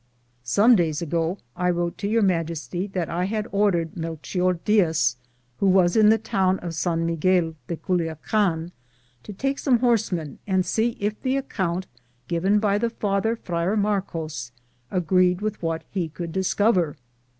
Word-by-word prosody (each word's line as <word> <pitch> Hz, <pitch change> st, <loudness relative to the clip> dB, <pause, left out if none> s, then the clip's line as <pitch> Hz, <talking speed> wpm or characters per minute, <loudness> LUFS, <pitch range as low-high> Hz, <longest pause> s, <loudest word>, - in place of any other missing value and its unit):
Some 205 Hz, -, +5 dB
days 165 Hz, -4 st, 0 dB
ago 165 Hz, +3 st, -1 dB, 0.2 s
I 180 Hz, 0 st, 0 dB
wrote 175 Hz, -1 st, -1 dB
to 200 Hz, -, -2 dB
Your 225 Hz, +1 st, +2 dB
Majesty 170 Hz, 0 st, -1 dB
that 185 Hz, -4 st, -3 dB
I 175 Hz, +2 st, -1 dB
had 215 Hz, +2 st, -2 dB
ordered 195 Hz, -5 st, +1 dB
MelcMor 170 Hz, +2 st, -2 dB
Diaz, 160 Hz, -, +3 dB, 0.4 s
who 200 Hz, -, +2 dB
was 185 Hz, -2 st, +4 dB
in 215 Hz, -1 st, +6 dB
the 220 Hz, -, +5 dB
town 190 Hz, -3 st, +1 dB
of 175 Hz, -2 st, -6 dB
San 165 Hz, 0 st, 0 dB
Miguel 165 Hz, 0 st, +1 dB
de 170 Hz, -, -2 dB
Culuacan, 170 Hz, +1 st, -1 dB, 0.5 s
to 210 Hz, -, -9 dB
take 270 Hz, +7 st, -2 dB
some 260 Hz, -4 st, +3 dB
horsemen 215 Hz, -, 0 dB
and 190 Hz, -2 st, +1 dB
see 225 Hz, +5 st, 0 dB
if 210 Hz, +1 st, -2 dB
the 265 Hz, 0 st, 0 dB
account 185 Hz, -9 st, -2 dB, 0.4 s
given 185 Hz, +4 st, +2 dB
by 205 Hz, -1 st, +2 dB
the 235 Hz, +1 st, 0 dB
father. 210 Hz, 0 st, 0 dB
Friar 180 Hz, 0 st, -1 dB
Marcos, 165 Hz, -11 st, -2 dB, 0.4 s
agreed 180 Hz, 0 st, +2 dB
with 215 Hz, 0 st, -3 dB
what 165 Hz, -1 st, -2 dB
he 180 Hz, -5 st, -2 dB
could 170 Hz, +1 st, -6 dB
discover. 190 Hz, -2 st, +1 dB
185 Hz, 155 wpm, -24 LUFS, 165-205 Hz, 0.5 s, in